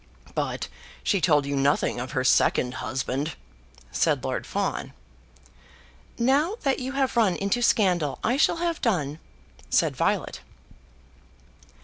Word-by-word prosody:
"But - - -2 0.4
she 200 -4 +1
told 150 -5 +3
you 140 0 -2
nothing 140 -2 +1
of 125 +1 -5
her 130 -3 0
second 125 -1 +3
husband?" 135 +4 -2 0.6
said 70 - +1
Lord - - -3
Fawn. - - -2 1.2
"Now 280 - +2
that 275 -2 +1
you 260 +1 -4
have 270 -2 0
run 215 -6 +3
into 200 +5 0
scandal, 180 - +2
I 240 - +2
shall 305 +3 +3
have 335 -1 -2
done," 160 - 0 0.5
said - - +2
Violet. - - 0
185 Hz, 125 wpm, -26 LUFS, -, 1.2 s, told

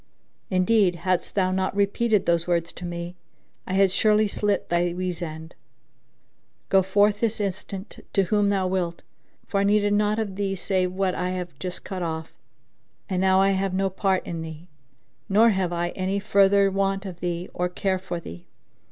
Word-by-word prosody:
Indeed, 185 0 +3
haddest 180 +1 -1
thou 185 -2 +2
not 190 +1 -1
repeated 205 +1 +2
those 170 0 +1
words 170 -1 0
to 180 - -8
me, 175 0 -6 0.5
I 185 - -3
had 195 -1 +4
surely 215 +2 +3
slit 205 0 -1
thy 175 0 +1
weasand. 170 -3 -4 1.2
Go 195 - +5
forth 205 +2 +2
this 225 -1 0
instant 195 0 -5
to 195 - +3
whom 205 +2 +2
thou 195 -2 +1
wilt, 180 -2 -2 0.4
for 200 - -1
I - - +2
needed 205 0 +3
naught 210 +1 +2
of 205 -4 -3
thee 195 -1 -1
save 185 0 0
what 190 0 0
I 180 0 -2
have 180 -1 -4
just 180 -1 -5
cut 190 -2 -5
off; 160 -1 -4 0.8
and 185 -1 0
now 190 0 +4
I 195 0 +4
have 190 -1 0
no 195 0 +1
part 190 0 0
in 165 -2 -4
thee, 160 +2 -9 0.6
nor 220 +4 +5
have 190 -3 0
I 175 0 -1
any 190 +2 -2
further 200 -1 +4
want 195 0 0
of 180 -3 -7
thee 175 0 -3
or 180 0 -1
care 190 +1 -1
for 180 -2 -5
thee. 85 - -10
190 Hz, 180 wpm, -25 LUFS, 175-200 Hz, 1.2 s, Go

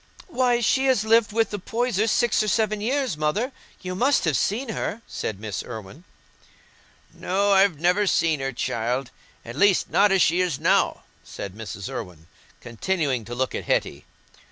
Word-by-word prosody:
"Why, 250 -6 +1
she 265 +4 +2
has 255 -6 +3
lived 225 0 +4
with 225 +1 +1
the 205 - -4
Poysers 225 +1 -1
six 235 +1 +2
or 215 - -1
seven 215 0 0
years, 260 - 0
Mother; 180 - -1 0.3
you 185 -1 -5
must 255 +4 +2
have 160 -4 +1
seen 225 - -1
her," 225 +1 -4
said 100 -3 -5
Miss 105 -3 -4
Irwine. 115 - -10 1.1
"No, 200 +2 0
I've 195 -5 +4
never 180 +5 +2
seen 160 -4 +2
her, 135 0 -2
child—at 120 0 -4
least 195 +4 +3
not 205 0 +4
as 195 -2 +4
she 175 +3 +2
is 175 -7 -1
now," - - +2 0.2
said 100 - -8
Mrs. 100 -2 -7
Irwine, 90 -7 -7 0.4
continuing 130 - -2
to 120 +3 -6
look 130 +1 -1
at - - -4
Hetty. 70 - -1
185 Hz, 165 wpm, -24 LUFS, -, 1.1 s, lived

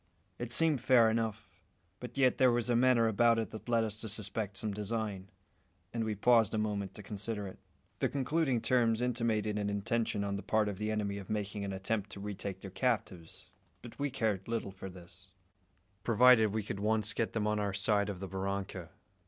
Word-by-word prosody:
It 120 -1 -4
seemed 155 +1 +3
fair 115 -4 +5
enough; 110 -5 -3 0.4
but 125 +1 -8
yet 130 -2 +3
there 130 -1 +6
was 120 0 +1
a - - +3
manner 120 -1 +4
about 115 +2 +4
it 115 - -2
that 110 +2 -9
led 115 -1 +3
us 110 0 -3
to 110 - -5
suspect 105 -1 -3
some 105 0 -3
design, 105 -2 -3 0.6
and 115 -1 -1
we 110 -1 -2
paused 115 0 +4
a - - 0
moment 100 -3 -2
to 105 - -9
consider 105 +1 -4
it. 95 - -10 0.4
The - - +1
concluding 140 -2 0
terms 115 -3 +2
intimated 115 -4 0
an 100 0 -1
intention 110 +1 -1
on 100 0 -2
the - - -5
part 110 -1 +1
of 100 -2 -6
the 105 0 -1
enemy 105 -2 -1
of 95 - -10
making 105 -1 -3
an 100 - -3
attempt 100 +2 -2
to - - -8
retake 100 -1 -5
their 95 - -8
captives; 95 -8 -3 0.3
but 120 +2 -11
we 145 0 0
cared 110 -7 -1
little 115 -4 -2
for 95 0 -8
this, 90 +2 -13 0.7
provided 120 -1 +6
we 110 +1 -2
could 100 - -5
once 110 +1 0
get 115 - -1
them 110 -2 0
on 105 0 +1
our 100 -1 0
side 100 +1 +1
of 95 -3 -5
the 95 - -5
barranca. 95 -2 -4
110 Hz, 200 wpm, -32 LUFS, 100-115 Hz, 0.7 s, there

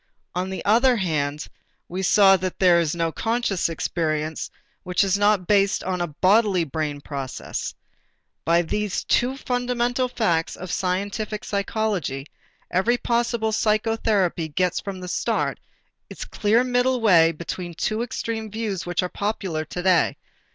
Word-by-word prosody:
On 180 +1 -2
the 190 - -5
other 245 +5 +5
hand, 150 -7 -1 0.4
we 185 +2 -4
saw 195 +1 +6
that 185 -1 -3
there 180 -2 +5
is 165 -1 0
no 165 -1 0
conscious 225 -4 0
experience 155 -1 -2 0.3
which 180 +1 +1
is 195 -1 +2
not 205 -2 +3
based 200 0 +2
on 180 -1 -2
a 175 - 0
bodily 190 +3 +3
brain 150 -1 -3
process. 140 -3 -5 0.7
By 170 +2 +3
these 210 +4 -2
two 255 +2 +1
fundamental 245 0 0
facts 190 -10 0
of 185 0 -7
scientific 200 +3 -2
psychology, 200 - -2 0.5
every 225 +7 +2
possible 235 -2 0
psychotherapy 215 -5 +1
gets 180 +3 0
from 195 -2 -6
the 180 - -6
start - - -1 0.5
its - - -7
clear 220 +3 +2
middle 250 0 +1
way 170 -7 +5
between 170 +2 -6
two 215 +6 -1
extreme 225 -2 -4
views 210 -5 -3
which 175 +1 0
are - - 0
popular 190 -7 -3
today. 180 +2 +1
190 Hz, 140 wpm, -23 LUFS, 170-220 Hz, 0.7 s, saw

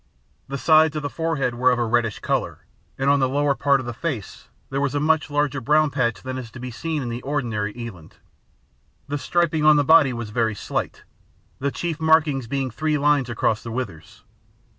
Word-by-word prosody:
The 140 - -4
sides 155 +1 +4
of 150 - -3
the 145 - -3
forehead 155 -6 -1
were 125 +2 +3
of 125 - +2
a 120 - 0
reddish 115 -1 0
colour, - - -2 0.3
and 135 - -1
on 140 0 +4
the 130 -1 +2
lower 145 +1 +1
part 140 0 +2
of 130 - -6
the 120 - -4
face 120 - -5 0.2
there 135 +1 -1
was 145 0 -1
a - - +2
much 155 +1 +1
larger 145 -2 0
brown 150 +4 +3
patch 125 -4 -1
than 130 0 -4
is 120 -3 -8
to 130 - -9
be 125 0 -6
seen 155 +4 -3
on 120 - -4
the 120 +1 -5
ordinary 115 -8 -2
eland. 115 -10 -9 0.9
The 145 +1 -3
striping 165 -1 0
on 155 0 +7
the 145 - +3
body 160 -2 +6
was 115 -3 -5
very 110 -1 0
slight, - - -4 0.6
the 140 - 0
chief 165 +2 -4
markings 155 -5 +3
being 135 0 -2
three 155 +5 -1
lines 145 -3 +2
across 110 -2 0
the 115 - -8
withers. 105 -10 -6
135 Hz, 205 wpm, -23 LUFS, 120-150 Hz, 0.9 s, on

